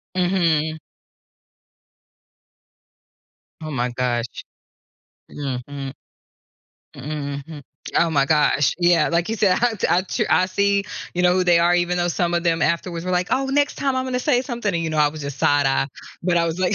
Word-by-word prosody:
Mhm. 165 -4 +1 2.8
Oh 155 -1 -6
my 125 -2 -1
gosh. 120 -1 -3 0.9
Mhm. 135 0 -5 1.0
Mm-mm, 140 -1 -5
hmm. 160 -3 -9 0.4
Oh 170 - +3
my 140 -3 +2
gosh. 150 -2 +2
Yeah, 175 -1 +3
like 170 +4 0
you 225 - -1
said, 195 -3 +3
I 245 -2 +2
t - - -1
I 175 +2 +3
tru 185 - -2
I 185 - +4
see, 200 +1 +1 0.3
you 180 - -1
know, 180 0 +4
who 185 - +2
they 175 -1 +4
are 175 +1 +3
even 175 0 +1
though 175 0 +1
some 175 0 -1
of 170 0 0
them 165 -1 +1
afterwards 170 +2 -1
were 185 - -2
like, 180 +1 +1
"Oh, 270 +1 +1
next 285 +1 +1
time 270 -2 -1
I'm 260 0 -1
gonna 250 -1 -2
say 250 -1 +2
something," 240 -6 -3
and 165 -1 -1
you 160 - -2
know, 155 - -3
I 150 -1 +5
was 155 0 -7
just 140 -1 -6
side-eye, 140 -1 +2 0.4
but 175 -1 +2
I 170 - +2
was 165 +2 -3
like 185 - +1
170 Hz, 185 wpm, -21 LUFS, 150-185 Hz, 2.8 s, I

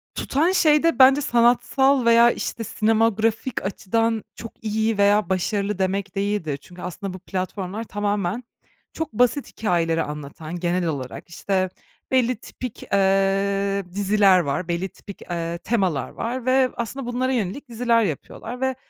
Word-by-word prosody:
tutan 315 +6 +1
şey 305 -5 +4
de 330 -7 +2
bence 270 +2 +7
sanatsal 245 +2 +3
veya, 235 +1 +6
işte, 230 - -4
sinematografik 225 +2 +1
açıdan 225 +3 0
çok 230 - -11
iyi 220 0 0
veya 205 -1 +3
başarılı 200 +2 -1
demek 195 +1 -1
değildir. 195 -7 -1
Çünkü 180 +2 -13
aslında 185 +2 -5
bu 185 - -8
platformlar 185 +3 -4
tamamen 205 0 -2 0.5
çok 320 -6 -4
basit 250 +5 +2
hikâyeleri 165 -5 0
anlatan 150 +2 -7
genel 175 +1 0
olarak, 140 0 -5
işte, 185 +2 -1 0.4
belli 255 -1 +3
tipik, 245 +1 -8
eee, 195 0 +2
diziler 200 -1 +4
var, 155 +2 -2
belli 175 +2 -2
tipik, 200 +3 -12
eee, 170 -1 -4
temalar 185 - -1
var 240 +1 -4
ve 260 0 +3
aslında 240 +3 -4
bunlara 250 +2 -1
yönelik 245 +3 -3
diziler 235 0 +2
yapıyorlar 225 - -5
ve 265 0 0
205 Hz, 140 wpm, -23 LUFS, 185-235 Hz, 0.5 s, bence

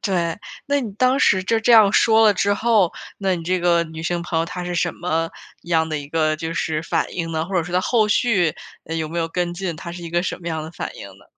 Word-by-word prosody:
对， 175 -3 -1 0.3
那 285 0 +1
你 225 -5 -4
当 255 +4 +2
时 190 -7 +3
就 225 +4 +1
这 235 +2 +3
样 210 -3 +7
说 225 0 +5
了 210 - +6
之 200 +1 +1
后， 215 -5 +2 0.3
那 190 -2 +1
你 170 - -5
这 185 +2 0
个 170 -1 +3
女 160 0 -8
性 175 +1 -1
朋 165 -2 -2
友， 165 - +1
她 180 +1 -6
是 175 0 -4
什 175 0 0
么 165 -1 -2 0.3
样 160 -2 +1
的 155 -1 -2
一 140 0 -8
个 155 -1 +1
就 165 +1 -4
是 155 -1 -1
反 - - -1
应 165 -2 -3
呢？ 160 0 -1
或 190 +3 -7
者 170 - +2
说 175 +2 -6
她 180 - +3
后 220 +1 +2
续， 200 -8 +2 0.3
嗯， 165 +1 -4
有 160 -1 -2
没 170 +2 -4
有 165 0 -1
跟 175 +1 -2
进， 175 -2 -3
她 170 +1 -7
是 175 0 -8
一 165 - -7
个 175 +1 +1
什 185 - -4
么 170 - -11
样 160 -1 -3
的 160 - -7
反 - - -6
应 100 - -9
呢？ - - -20
175 Hz, 295 characters per minute, -21 LUFS, 165-195 Hz, 0.3 s, 样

